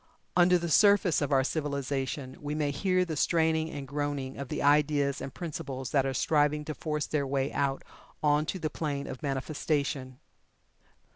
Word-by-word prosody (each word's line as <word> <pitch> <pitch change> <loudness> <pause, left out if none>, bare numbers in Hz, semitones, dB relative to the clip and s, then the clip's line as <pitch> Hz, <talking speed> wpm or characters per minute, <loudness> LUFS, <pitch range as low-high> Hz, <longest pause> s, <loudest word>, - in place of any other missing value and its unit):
Under 180 0 +5
the 170 0 -3
surface 200 0 +4
of 145 - -1
our 135 -1 +4
civilization 140 -2 -2
we 150 0 -3
may 150 -2 0
hear 185 +4 +1
the 160 -3 -4
straining 160 +1 +2
and 140 -3 -6
groaning 145 -1 -3
of 140 -2 -6
the - - -2
ideas 145 -1 +3
and 135 - -5
principles 135 -6 -5
that 135 -2 +2
are 135 - -1
striving 150 +2 +2
to 155 - -4
force 150 -1 -2
their 145 -3 -1
way 135 +1 -1
out 140 -1 0 0.4
on 150 +1 +3
to 190 - -2
the 160 -3 -3
plane 145 -3 -3
of 130 - -7
manifestation. 140 -2 -2
145 Hz, 170 wpm, -29 LUFS, 140-155 Hz, 0.4 s, Under